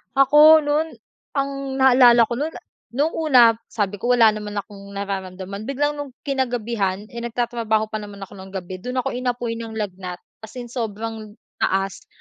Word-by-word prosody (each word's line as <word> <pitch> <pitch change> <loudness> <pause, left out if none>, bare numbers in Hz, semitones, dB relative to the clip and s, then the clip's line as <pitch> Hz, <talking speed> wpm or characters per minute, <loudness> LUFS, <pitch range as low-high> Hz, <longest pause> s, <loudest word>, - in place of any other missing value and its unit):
Ako 300 +3 +7
nun, 300 +2 0 0.4
ang 275 0 0 0.2
naalala 250 -3 +6
ko 235 +1 -2
nun, 310 +3 -2 0.4
nung 290 +6 +1
una 260 -9 +5 0.2
sabi 205 -2 -2
ko 245 +3 +2
wala 225 -2 +6
naman 210 -1 -6
akong 200 -1 -7
nararamdaman, 195 0 -5
biglang 290 +2 -1
nung 275 -3 -7
kinagabihan 235 -8 -1
eh, 235 - -6
nagtatrabaho 230 -2 -1
pa 215 - -2
naman 205 -1 -9
ako 195 - -11
ng 190 - -9
gabi 185 -1 -6
dun 250 +6 -5
ako - - -2
inapoy 245 -2 -2
ng 225 -1 -7
lagnat 185 -4 -5 0.2
as 220 +2 -12
in 240 -2 -7
sobrang 220 -2 -5 0.2
taas 195 0 -1
230 Hz, 160 wpm, -22 LUFS, 205-255 Hz, 0.4 s, Ako